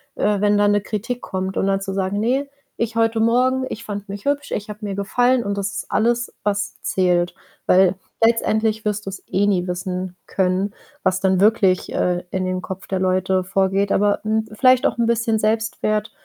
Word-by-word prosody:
äh, 210 Hz, -1 st, +1 dB
wenn 205 Hz, 0 st, +3 dB
da 205 Hz, 0 st, +4 dB
'ne 205 Hz, 0 st, +3 dB
Kritik 225 Hz, +5 st, -4 dB
kommt. 190 Hz, 0 st, -4 dB
Und -, -, +1 dB
dann 195 Hz, 0 st, +1 dB
zu 195 Hz, 0 st, -4 dB
sagen: 195 Hz, +1 st, -1 dB
„Ne, 260 Hz, +6 st, 0 dB, 0.3 s
ich 230 Hz, 0 st, -1 dB
heute 225 Hz, 0 st, +2 dB
Morgen 255 Hz, +3 st, +2 dB
ich 225 Hz, -, -6 dB
fand 205 Hz, 0 st, -6 dB
mich 200 Hz, 0 st, -7 dB
hübsch. 285 Hz, 0 st, -1 dB
Ich 205 Hz, +1 st, -3 dB
habe 210 Hz, +1 st, -7 dB
mir 200 Hz, -, -3 dB
gefallen.” 245 Hz, +5 st, +2 dB
Und 200 Hz, -1 st, -3 dB
das 195 Hz, -1 st, -2 dB
ist 205 Hz, -, -6 dB
alles, 235 Hz, +2 st, +1 dB
was 205 Hz, 0 st, -2 dB
zählt. 180 Hz, -2 st, +1 dB, 0.3 s
Weil 185 Hz, 0 st, +4 dB, 0.3 s
letztendlich 220 Hz, -1 st, +2 dB
wirst 210 Hz, 0 st, -2 dB
du's 195 Hz, -1 st, -6 dB
eh 200 Hz, +2 st, +1 dB
nie 185 Hz, -3 st, +1 dB
wissen 180 Hz, 0 st, -4 dB
können, 190 Hz, +2 st, 0 dB, 0.3 s
was 185 Hz, 0 st, +2 dB
dann 190 Hz, -1 st, +2 dB
wirklich, 200 Hz, -3 st, +3 dB
äh, 180 Hz, 0 st, 0 dB
in 185 Hz, 0 st, -1 dB
dem 185 Hz, 0 st, -2 dB
Kopf 190 Hz, 0 st, -7 dB
der 190 Hz, -, -1 dB
Leute 185 Hz, 0 st, +1 dB
vorgeht. 195 Hz, +1 st, +1 dB
Aber, 205 Hz, 0 st, +2 dB
hm, 220 Hz, 0 st, 0 dB
vielleicht 255 Hz, +2 st, +4 dB
auch -, -, -3 dB
'n 235 Hz, -, +2 dB
bisschen 230 Hz, -1 st, +1 dB
Selbstwert 215 Hz, -1 st, 0 dB
205 Hz, 195 wpm, -21 LUFS, 190-225 Hz, 0.3 s, da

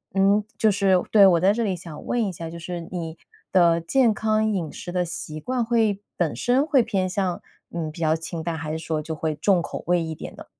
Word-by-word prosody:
嗯， 200 Hz, +2 st, +4 dB
就 215 Hz, -1 st, +4 dB
是 190 Hz, -2 st, +3 dB
对， 205 Hz, -3 st, +8 dB
我 175 Hz, -3 st, +4 dB
在 190 Hz, +2 st, +5 dB
这 235 Hz, -, -1 dB
里 190 Hz, -, 0 dB
想 165 Hz, -3 st, -10 dB
问 240 Hz, -1 st, 0 dB
一 195 Hz, -, -2 dB
下， 165 Hz, -1 st, -7 dB
就 170 Hz, -, -8 dB
是 170 Hz, 0 st, -6 dB
你 165 Hz, -2 st, -5 dB, 0.3 s
的 170 Hz, -3 st, +4 dB
健 235 Hz, +8 st, +3 dB
康 215 Hz, 0 st, +1 dB
饮 175 Hz, -7 st, -3 dB
食 175 Hz, -, -7 dB
的 180 Hz, 0 st, 0 dB
习 155 Hz, -2 st, -6 dB
惯 250 Hz, +9 st, -1 dB
会 225 Hz, -4 st, +1 dB, 0.2 s
本 175 Hz, -3 st, 0 dB
身 260 Hz, +4 st, +2 dB
会 275 Hz, -5 st, +4 dB
偏 200 Hz, -5 st, 0 dB
向， 185 Hz, -1 st, -1 dB, 0.3 s
嗯， 165 Hz, -2 st, -4 dB
比 160 Hz, -, -12 dB
较 160 Hz, 0 st, +3 dB
清 165 Hz, 0 st, -5 dB
淡， 165 Hz, 0 st, -3 dB
还 155 Hz, 0 st, -4 dB
是 160 Hz, -, -3 dB
说 160 Hz, -1 st, -2 dB
就 160 Hz, -, -4 dB
会 155 Hz, 0 st, -2 dB
重 180 Hz, +4 st, +2 dB
口 -, -, -6 dB
味 175 Hz, 0 st, +2 dB
一 160 Hz, -1 st, -4 dB
点 -, -, -9 dB
呢？ -, -, -11 dB
180 Hz, 255 characters per minute, -24 LUFS, 165-205 Hz, 0.3 s, 对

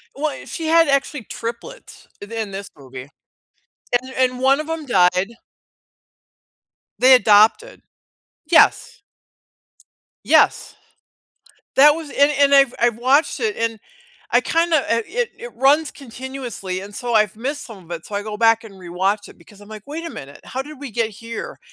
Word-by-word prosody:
Well, 295 Hz, 0 st, -4 dB
she 325 Hz, -2 st, -5 dB
had 330 Hz, -1 st, +4 dB
actually 275 Hz, -2 st, 0 dB
triplets 235 Hz, -, -8 dB
in 205 Hz, +2 st, -10 dB
in 220 Hz, -3 st, -4 dB
this 195 Hz, 0 st, -7 dB
movie, 130 Hz, 0 st, -11 dB, 0.9 s
and 260 Hz, 0 st, -11 dB
and 255 Hz, -1 st, +1 dB
1 270 Hz, +2 st, +3 dB
of 310 Hz, -, -5 dB
them 325 Hz, -2 st, -4 dB
died. 185 Hz, -4 st, +2 dB, 1.7 s
They 260 Hz, +1 st, +7 dB
adopted. 225 Hz, -, +4 dB, 0.7 s
Yes. 335 Hz, -, +3 dB, 1.2 s
Yes. -, -, +2 dB, 1.0 s
That 290 Hz, +2 st, +8 dB
was 320 Hz, -2 st, -7 dB
and 285 Hz, +1 st, +3 dB
and 280 Hz, 0 st, +5 dB
I've 275 Hz, -3 st, +5 dB
I've 235 Hz, -2 st, +2 dB
watched 265 Hz, +6 st, +2 dB
it, 435 Hz, -3 st, -1 dB
and 230 Hz, -1 st, -2 dB, 0.5 s
I -, -, +4 dB
kinda 330 Hz, -1 st, +1 dB
a 230 Hz, -, +2 dB
it 480 Hz, 0 st, -2 dB
it 485 Hz, +1 st, -10 dB
runs 290 Hz, +3 st, +3 dB
continuously 245 Hz, -7 st, -7 dB
and 200 Hz, +1 st, -11 dB
so 240 Hz, +1 st, -4 dB
I've 215 Hz, -1 st, +2 dB
missed 280 Hz, +5 st, -4 dB
some 200 Hz, -7 st, -12 dB
of 170 Hz, -, -21 dB
it, 170 Hz, -1 st, -6 dB
so 205 Hz, -, -9 dB
I 205 Hz, -, -2 dB
go 210 Hz, 0 st, -6 dB
back 225 Hz, 0 st, +3 dB
and 205 Hz, -3 st, -12 dB
rewatch 190 Hz, +3 st, -2 dB
it -, -, -15 dB
because 200 Hz, +4 st, -19 dB
I'm 205 Hz, -, -15 dB
like, 215 Hz, -2 st, -10 dB
"Wait 325 Hz, +3 st, -6 dB
a -, -, -6 dB
minute. 140 Hz, +1 st, -11 dB
How 265 Hz, +1 st, -5 dB
did 300 Hz, 0 st, -12 dB
we 280 Hz, -4 st, -7 dB
get 225 Hz, 0 st, -1 dB
here?" 230 Hz, +2 st, -8 dB
240 Hz, 165 wpm, -20 LUFS, 205-285 Hz, 1.7 s, That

